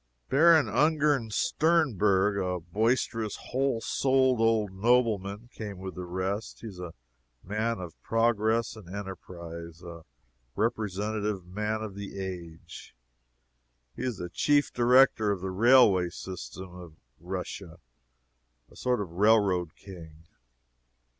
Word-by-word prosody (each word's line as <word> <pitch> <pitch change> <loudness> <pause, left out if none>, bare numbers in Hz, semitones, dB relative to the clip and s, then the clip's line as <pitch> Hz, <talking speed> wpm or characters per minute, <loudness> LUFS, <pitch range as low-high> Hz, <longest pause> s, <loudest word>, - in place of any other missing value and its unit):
Baron 155 -1 +5
Ungern 145 0 +2
Sternberg, 105 - +2
a 90 -2 -1
boisterous, 110 +4 -1
whole 130 -3 -1
souled 130 +1 +2
old 110 -3 +2
nobleman, 105 0 +1
came 105 -3 -7
with 95 0 -7
the 90 -1 -6
rest. 95 +4 -4
He 115 - -7
is 95 -3 -12
a 90 -2 -7 0.5
man 110 +3 -2
of 90 -3 -7
progress 115 0 +1
and 105 -6 -12
enterprise 85 -4 -8
a 85 -1 -9 0.5
representative 105 -2 -2
man 105 +4 -3
of 105 -3 -6
the 100 0 -8
age. 85 -6 -8 1.0
He - - -7
is 125 -5 -2
the 90 - -6
Chief 145 +6 +2
Director 120 -3 +4
of 100 -3 -1
the 95 0 -3
railway 100 -4 +5
system 95 0 -8
of 90 -3 -11 0.2
Russia 90 0 -6 0.9
a - - -17
sort 125 -3 0
of 95 -5 -6
railroad 95 -3 +2
king. 80 -5 -12
100 Hz, 120 wpm, -28 LUFS, 90-115 Hz, 1.0 s, Baron